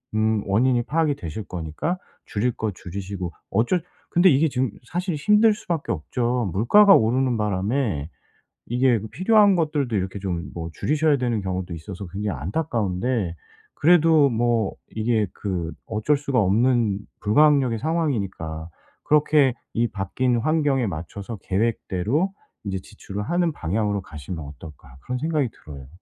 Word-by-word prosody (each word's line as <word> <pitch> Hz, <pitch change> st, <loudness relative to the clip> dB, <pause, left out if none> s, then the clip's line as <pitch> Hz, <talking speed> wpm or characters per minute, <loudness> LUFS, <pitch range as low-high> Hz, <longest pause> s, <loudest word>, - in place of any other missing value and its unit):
음 110 Hz, 0 st, +2 dB
원인이 120 Hz, +5 st, +2 dB
파악이 155 Hz, +2 st, +1 dB
되실 90 Hz, -, -6 dB
거니까 90 Hz, -, -3 dB, 0.3 s
줄일 115 Hz, +4 st, -1 dB
거 110 Hz, -1 st, -2 dB
줄이시고 95 Hz, -1 st, -6 dB, 0.2 s
어쩔 120 Hz, -, +2 dB, 0.3 s
근데 175 Hz, +2 st, +5 dB
이게 150 Hz, +1 st, +4 dB
지금 130 Hz, -3 st, -1 dB
사실 175 Hz, +4 st, -2 dB
힘들 210 Hz, +8 st, +4 dB
수밖에 170 Hz, -7 st, -3 dB
없죠. 120 Hz, +6 st, -1 dB
물가가 195 Hz, -, +6 dB
오르는 125 Hz, +3 st, +2 dB
바람에 105 Hz, -, -1 dB, 0.6 s
이게 125 Hz, -1 st, +2 dB
그 110 Hz, -, -7 dB
필요한 200 Hz, -, +4 dB
것들도 150 Hz, -8 st, 0 dB
이렇게 95 Hz, 0 st, -2 dB
좀 90 Hz, -3 st, -4 dB
뭐 85 Hz, -1 st, -5 dB
줄이셔야 150 Hz, -, +2 dB
되는 120 Hz, -4 st, -1 dB
경우도 95 Hz, -2 st, -3 dB
있어서 95 Hz, +4 st, -7 dB
굉장히 95 Hz, -3 st, -4 dB
안타까운데 105 Hz, -, -1 dB, 0.4 s
그래도 160 Hz, -3 st, +5 dB
뭐 115 Hz, -3 st, +1 dB, 0.2 s
이게 110 Hz, -1 st, +1 dB
그 90 Hz, -5 st, -3 dB, 0.2 s
어쩔 110 Hz, +7 st, +1 dB
수가 140 Hz, -2 st, 0 dB
없는 110 Hz, 0 st, +2 dB, 0.2 s
불가항력의 130 Hz, +1 st, +4 dB
상황이니까 100 Hz, -, -2 dB, 0.3 s
그렇게 150 Hz, -3 st, +3 dB, 0.2 s
'이 120 Hz, +1 st, +1 dB
바뀐 120 Hz, +6 st, -1 dB
환경에 145 Hz, -1 st, +1 dB
맞춰서 95 Hz, +6 st, -6 dB
계획대로 115 Hz, -, 0 dB, 0.3 s
인제 95 Hz, -1 st, -2 dB
지출을 105 Hz, -1 st, -7 dB
하는 175 Hz, +7 st, +1 dB
방향으로 100 Hz, -, -1 dB
가시면 80 Hz, -1 st, -7 dB
어떨까?' 70 Hz, -2 st, -12 dB
그런 125 Hz, -, -3 dB
생각이 155 Hz, -2 st, 0 dB, 0.2 s
들어요. 70 Hz, -3 st, -9 dB
115 Hz, 330 characters per minute, -23 LUFS, 95-145 Hz, 0.6 s, 물가가